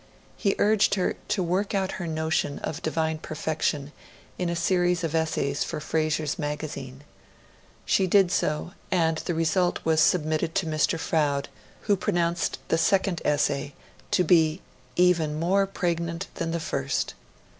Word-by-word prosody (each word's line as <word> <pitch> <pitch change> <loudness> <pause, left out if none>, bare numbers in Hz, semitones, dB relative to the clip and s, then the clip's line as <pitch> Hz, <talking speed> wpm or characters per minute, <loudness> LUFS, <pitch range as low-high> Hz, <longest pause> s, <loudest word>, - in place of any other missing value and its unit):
He 200 -2 0
urged 210 -1 +3
her 185 - 0
to 210 -2 0
'work 190 +4 0
out 190 -1 0
her 175 - -3
notion 160 -2 -1
of 160 +2 -4
Divine 160 0 -1
Perfection', 155 -2 -2 0.5
in 180 -1 0
a 170 - -1
series 175 0 +1
of 165 -2 -2
essays 155 -3 0
for - - -4
Frazer's 155 +1 -1
Magazine. 145 -3 -5 0.8
She 190 - +2
did 190 -1 +4
so; 150 +1 0 0.2
and 165 -3 +2
the 175 - -3
result 175 +2 +1
was 160 -1 +3
submitted 155 0 +2
to 190 - +1
Mr. 155 +1 +1
Froude, 145 -4 0 0.3
who 205 - +2
pronounced 170 -2 0
the 165 - +2
second 190 -1 +2
essay 145 -1 0 0.3
to 180 - +3
be 160 0 +3 0.3
'even 170 -4 +3
more 195 +4 +2
pregnant 170 -1 -2
than 165 - -3
the 170 +1 -1
first. 140 -4 -2
165 Hz, 145 wpm, -26 LUFS, 155-180 Hz, 0.8 s, did